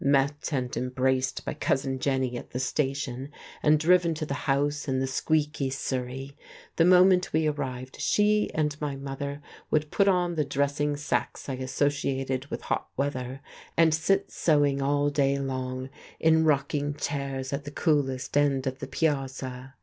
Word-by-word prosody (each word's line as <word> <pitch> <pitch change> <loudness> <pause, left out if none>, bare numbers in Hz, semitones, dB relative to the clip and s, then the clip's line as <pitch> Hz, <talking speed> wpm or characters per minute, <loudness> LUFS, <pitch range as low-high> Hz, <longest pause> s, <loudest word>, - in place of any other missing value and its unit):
Met 140 +1 +2
and 130 -4 -2
embraced 130 +1 0
by - - -2
Cousin 135 -3 -1
Jenny 130 -2 0
at - - -7
the 125 - -4
station 135 -1 -2 0.3
and 150 0 +4
driven 170 0 +4
to 155 - -3
the 140 - -3 0.2
house 145 +2 +1
in 130 -1 0
the 130 - +1
squeaky 150 +1 0
surrey, 130 +1 -4 0.4
the 165 - +5
moment 180 0 +5
we 160 0 +2
arrived 130 -4 -3
she 210 0 +3
and 150 -2 +1
my 145 -2 -2
mother 140 +1 -5 0.3
would 155 -1 +1
put 200 - +3
on 180 -2 +2
the 155 -2 +1
dressing 145 +1 0
sacks 145 - -2
I 135 - -2
associated 135 0 -1
with - - -5
hot - - -2
weather, 135 -1 -2 0.4
and 165 -1 +5
sit 195 +5 +1
sewing 145 -3 +2
all 145 +1 +2
day 140 -1 +2
long 130 -1 -3 0.3
in 160 0 +4
rocking 145 0 +1
chairs 140 -2 -3
at 140 +1 -2
the - - -5
coolest 145 -5 0
end 140 -2 +2
of 130 0 -3
the - - -5
piazza. 135 -3 -2
140 Hz, 160 wpm, -27 LUFS, 130-150 Hz, 0.4 s, the